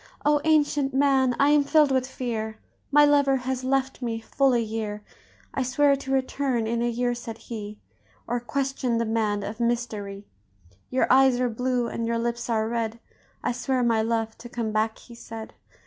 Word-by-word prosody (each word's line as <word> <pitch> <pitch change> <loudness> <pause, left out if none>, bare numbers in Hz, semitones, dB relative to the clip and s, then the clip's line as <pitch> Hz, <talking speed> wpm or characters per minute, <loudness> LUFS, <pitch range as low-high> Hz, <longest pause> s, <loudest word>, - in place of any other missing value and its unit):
"O, 295 0 +4
ancient 290 -3 +2
man! 265 -2 +3
I 280 - +5
am 295 -1 +5
filled 300 0 +4
with 260 -1 +1
fear, 225 -4 -4 0.3
My 295 +1 +7
lover 285 -2 +4
has 260 0 -3
left 265 0 0
me 230 -2 -2
full 265 +4 +1
a - - +3
year. 215 -2 -4 0.5
'I - - -1
swear 275 +3 +3
to 270 -1 -6
return 265 -2 0
in 230 +1 -1
a 240 - +1
year,' 245 +1 0
said 235 -2 -7
he, 215 -2 -7 0.5
'Or 245 - 0
question 260 0 -1
the 230 - 0
man 215 -2 0
of 210 +3 -6
mystery. 220 -4 -2 0.6
Your 255 - +2
eyes 265 -1 +5
are 250 -1 +1
blue, 250 +1 0
and 230 0 -3
your 230 0 0
lips 235 +1 -2
are 220 -1 +1
red; 230 -1 -2 0.4
I - - +1
swear, 250 +1 -1
my 230 -2 +3
love, 225 0 -1
to 240 +1 -10
come 235 -2 -3
back,' 220 +1 0
he 240 - -14
said. 225 -1 -9
240 Hz, 185 wpm, -25 LUFS, 225-265 Hz, 0.6 s, My